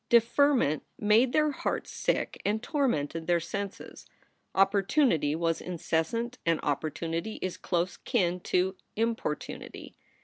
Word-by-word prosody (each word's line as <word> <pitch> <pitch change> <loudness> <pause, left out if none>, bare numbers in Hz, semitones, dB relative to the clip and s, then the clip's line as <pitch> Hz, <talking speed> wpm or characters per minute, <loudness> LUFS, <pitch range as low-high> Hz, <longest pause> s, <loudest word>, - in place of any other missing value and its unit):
Deferment 235 - +4 0.2
made 220 +4 +4
their 305 +2 +3
hearts - - -3
sick - - -1
and 215 +2 0
tormented 165 - -1
their 175 -1 +3
senses. 200 +4 -6 0.5
Opportunity 195 - +3
was 165 0 0
incessant 180 +8 -2
and 165 -1 +2
opportunity 165 +6 -2
is 185 -1 -2
close 175 0 -1
kin 180 -7 0
to 185 +2 0 0.2
importunity. 225 -9 -3
190 Hz, 110 wpm, -29 LUFS, 165-235 Hz, 0.5 s, Deferment